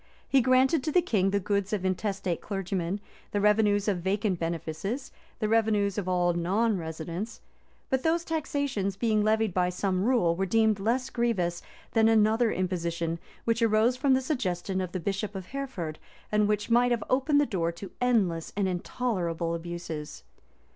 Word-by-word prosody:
He 270 - +4
granted 260 +4 +3
to 310 - 0
the 360 - +5
king 200 - +2
the 200 +1 +1
goods 200 0 -1
of 195 -3 -1
intestate 185 -2 -1
clergymen; 195 -1 -2 0.3
the 205 - -1
revenues 210 0 +3
of 195 -4 +1
vacant 190 0 0
benefices, 170 - -3 0.3
the 215 - -1
revenues 210 -3 +2
of 185 -2 -3
all 175 -1 +2
non 200 +6 +1
residents.[] 165 +6 -5 0.5
But 265 -1 +2
these 330 +2 +1
taxations, 285 - -1
being 215 0 +1
levied 220 -2 +2
by 180 0 +2
some 185 +1 -1
rule, 220 -8 +3
were 190 +2 -1
deemed 220 +1 +3
less 245 +6 0
grievous 190 -8 0 0.3
than 225 -1 +4
another 225 +1 +4
imposition, 170 -2 -2 0.3
which 230 0 +1
arose 225 +2 +3
from 265 +1 +3
the 260 - +1
suggestion 190 - -2
of 180 -2 -4
the 185 - -3
bishop 200 +3 -3
of 190 -2 -5
Hereford, 250 - -5 0.3
and 210 -1 +3
which 210 +2 -1
might 245 +1 +5
have 235 -3 0
opened 275 +3 +3
the 290 - +4
door 170 -8 -1
to 190 +3 -9
endless 195 -10 +1
and 200 -2 +2
intolerable 175 -3 -2
abuses. 165 - -6
205 Hz, 170 wpm, -28 LUFS, 180-230 Hz, 0.5 s, the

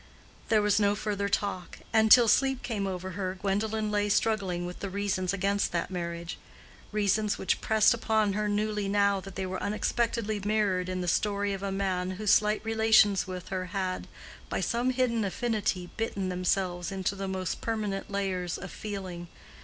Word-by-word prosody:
There 215 -2 +4
was 210 0 +3
no 205 -1 +3
further 200 -1 -2
talk, 195 -3 -2 0.2
and 220 -1 +4
till 240 -2 +9
sleep 265 +3 +3
came 205 -5 -2
over 185 0 -4
her 185 0 -3
Gwendolen 210 +2 -1
lay 205 0 +1
struggling 195 -5 +1
with 180 0 -7
the 200 - -4
reasons 190 -2 -1
against 200 +1 0
that 170 +2 -1
marriage—reasons 185 +4 -3
which 190 - 0
pressed 220 0 +4
upon 220 -3 +1
her 210 +1 -1
newly 210 0 0
now 200 0 +3
that 195 0 -10
they 190 - -2
were 185 0 -4
unexpectedly 215 0 -1
mirrored 200 -3 +1
in 185 0 -2
the 180 - -3
story 200 +2 +1
of 195 - -5
a 200 -1 -2
man 190 -2 -1
whose 210 -1 +1
slight 210 +1 +3
relations 220 -3 +4
with 185 -1 -6
her 185 -1 -2
had, 185 -1 -2 0.4
by - - -1
some 240 +2 0
hidden 250 -3 +1
affinity, 200 -3 -1
bitten 200 -4 -2
themselves 180 -1 -1
into 190 0 -1
the 195 0 -4
most 185 -2 -3
permanent 210 -4 -2
layers 190 -3 -2
of 195 - -8
feeling. 190 -4 -6
200 Hz, 170 wpm, -29 LUFS, 185-215 Hz, 0.4 s, till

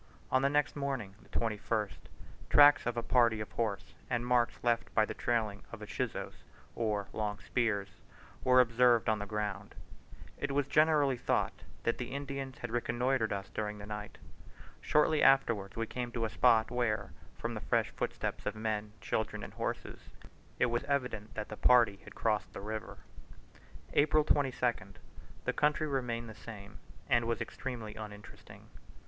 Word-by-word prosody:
On 130 - +4
the 140 - +3
next 145 0 +1
morning 135 -9 -3 0.2
(21st) 110 -1 -1 0.5
tracks 145 -2 +7
of 120 0 -1
a 120 - 0
party 115 -3 +3
of 105 - -5
horse 110 -4 -2 0.2
and 120 -1 0
marks 125 -1 +2
left 120 -1 +1
by 110 - +5
the - - -5
trailing 110 -4 -1
of 115 - -6
the 105 - -7
chuzos, - - -4 0.3
or 105 -3 -1
long 105 -1 -2
spears, 105 -3 0 0.5
were 130 0 +6
observed 120 -1 +4
on 110 -1 +2
the 105 - -5
ground. 105 -3 -3 0.6
It - - -2
was 145 0 +2
generally 150 -2 +3
thought - - 0 0.3
that 115 - 0
the 125 +1 -4
Indians 140 -2 -5
had 125 - -6
reconnoitred 120 0 0
us 100 -2 -4
during 105 +1 -3
the 105 - -8
night. 105 0 -6 0.6
Shortly 150 0 +3
afterwards 115 -7 +4
we 115 - -1
came 120 +1 -4
to 115 -2 0
a 110 - -3
spot 110 -1 +4
where, 110 -5 0 0.3
from - - -3
the - - -5
fresh - - +1
footsteps - - -3
of - - -1
men, 110 -1 -2
children, 110 - -2
and - - -8
horses, - - -4 0.6
it - - +4
was 120 0 0
evident 125 -6 -2
that 110 -1 -4
the 105 - -7
party 120 -5 +5
had - - -12
crossed 110 -2 0
the - - -6
river. 110 +2 -5 1.0
April 155 +1 +4
22nd. 130 -5 0 0.5
The - - +1
country 150 +1 +2
remained 125 -5 -2
the 110 - -8
same, 105 -2 -10 0.3
and 120 -1 +3
was 115 - 0
extremely 120 -5 -5
uninteresting. 105 -1 -11
115 Hz, 165 wpm, -32 LUFS, 105-125 Hz, 1.0 s, tracks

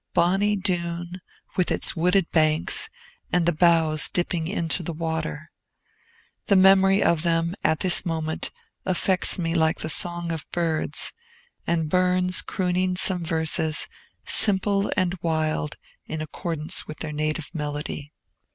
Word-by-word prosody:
Bonny 195 +4 +2
Doon, 175 -2 -3 0.3
with 185 - 0
its - - -1
wooded 180 +2 +2
banks, 155 - +2 0.4
and 180 -1 +1
the 175 - +3
boughs 160 -2 +3
dipping 175 -2 -1
into 170 -3 -1
the 170 0 -5
water! 160 -1 -4 1.0
The 200 - +3
memory 195 +1 +5
of 170 -2 +2
them, 170 0 0
at 160 - +1
this 180 -2 +7
moment, 160 -2 -3 0.3
affects 185 0 +1
me 165 -2 -2
like 160 -1 +1
the 155 - -4
song 175 +1 +1
of 160 -2 -6
birds, 160 -3 -1 0.5
and 165 -2 0
Burns 180 +2 +2
crooning 185 0 -1
some 180 -1 +2
verses, 160 -1 0 0.4
simple 200 -1 +4
and 185 -1 +1
wild, 155 -2 -2 0.3
in 160 - -5
accordance 155 0 -3
with 155 - -8
their 155 -1 -4
native 155 +2 -3
melody. 150 -1 -5
170 Hz, 135 wpm, -24 LUFS, 160-180 Hz, 1.0 s, this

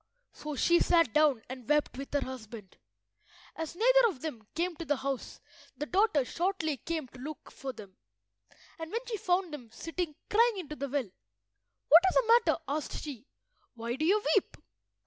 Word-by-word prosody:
So 300 -1 -6
she 345 +5 +4
sat 335 -10 +3
down 295 -7 +3
and 255 -1 -9
wept 300 0 +2
with 275 +1 -7
her 285 - +3
husband. 225 -6 -9 0.8
As 325 0 -5
neither - - +5
of 325 - -5
them 235 -10 -6
came 345 +1 -1
to 335 - -5
the 290 0 +1
house 270 -1 -4 0.4
the 295 - -3
daughter 360 - +2
shortly 335 -2 -1
came 320 0 -4
to 255 - -14
look 300 +4 -8
for 270 - -6
them, 200 -5 -12 0.8
and 325 0 -6
when 465 +2 -3
she 465 -3 -3
found 360 -3 0
them 250 -6 -8
sitting 330 +4 -4
crying 460 0 +3
into 305 -5 -6
the 280 -1 -4
well— 260 -8 -2 0.8
"What 325 +3 +10
is - - -4
the 475 -1 +6
matter?" - - +3
asked 295 +2 -3
she. 275 -3 -8 0.5
"Why 235 +1 -3
do 295 - -3
you 405 +6 +3
weep?" - - +1
305 Hz, 180 wpm, -30 LUFS, 260-355 Hz, 0.8 s, What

